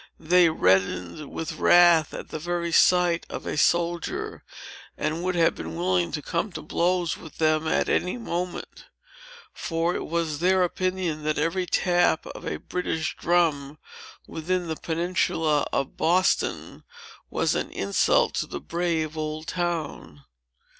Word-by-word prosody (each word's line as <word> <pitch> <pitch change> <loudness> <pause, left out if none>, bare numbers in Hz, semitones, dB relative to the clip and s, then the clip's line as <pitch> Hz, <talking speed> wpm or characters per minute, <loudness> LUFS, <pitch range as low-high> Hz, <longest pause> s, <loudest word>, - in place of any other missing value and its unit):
They 175 +1 +4
reddened 95 - +1
with 160 - -5
wrath 175 -3 +6
at - - -8
the 155 - -5
very 170 +1 -2
sight 175 0 +4
of - - -6
a - - -3
soldier, 170 +2 0 0.5
and 155 +3 -2
would 185 0 -1
have 165 -1 +3
been - - -7
willing 180 0 0
to 150 - -3
come 185 +4 -2
to 155 - -6
blows 175 +1 0
with 160 - -13
them, 155 0 +2
at - - +1
any 180 +6 0
moment. 180 -6 -5 0.7
For 165 +1 -1
it - - -4
was 160 -3 -2
their 185 +2 +3
opinion, 185 -3 -2
that 155 0 0
every 165 +4 0
tap 175 -2 +2
of - - -8
a - - -2
British 160 -3 -3
drum 155 -4 +1 0.5
within 175 +2 -2
the 160 - -2
peninsula 165 -3 0
of 135 - -2
Boston, 180 +3 +1 0.5
was - - 0
an - - -2
insult 100 0 +1
to - - -1
the - - -6
brave 165 -2 -2
old 155 0 -4
town. 170 - -4
170 Hz, 145 wpm, -25 LUFS, 155-175 Hz, 0.7 s, wrath